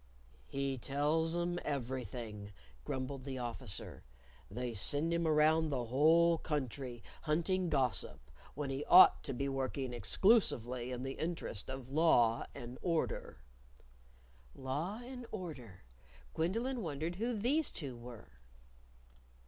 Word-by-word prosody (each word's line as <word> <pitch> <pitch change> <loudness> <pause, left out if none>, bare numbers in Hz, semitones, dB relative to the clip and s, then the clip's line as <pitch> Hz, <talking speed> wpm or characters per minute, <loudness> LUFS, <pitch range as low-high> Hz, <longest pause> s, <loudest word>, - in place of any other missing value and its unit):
"He 135 -1 -2
tells 155 +5 +1
'em 175 0 -1
everything," 120 -6 -4 0.3
grumbled 130 - -4
the 135 -1 -5
Officer. 120 -5 -5 0.5
"They 120 +4 -4
send 145 +11 +1
him 170 -1 +1
around 155 +1 +4
the 130 -4 -1
whole 160 +7 +4
country 130 -4 -3 0.2
hunting 170 +4 0
gossip 130 - +1 0.4
when 140 -1 -3
he 135 +2 -2
ought 185 - +8
to 140 - -2
be 140 +2 -2
working 135 -1 -2
exclusively 125 - +2
in 125 0 -4
the 135 0 -5
interest 160 - -3
of 130 -1 -6
Law 120 -7 +4
and 120 +1 -8
Order." 165 - -2 1.1
Law 155 - -3
and 250 -1 -8
Order 135 - -7 0.5
Gwendolyn 230 +10 -1
wondered 160 0 -3
who 230 +2 -1
these 280 +9 +2
two 135 -6 -6
were. 120 - -12
140 Hz, 120 wpm, -35 LUFS, 125-170 Hz, 1.1 s, ought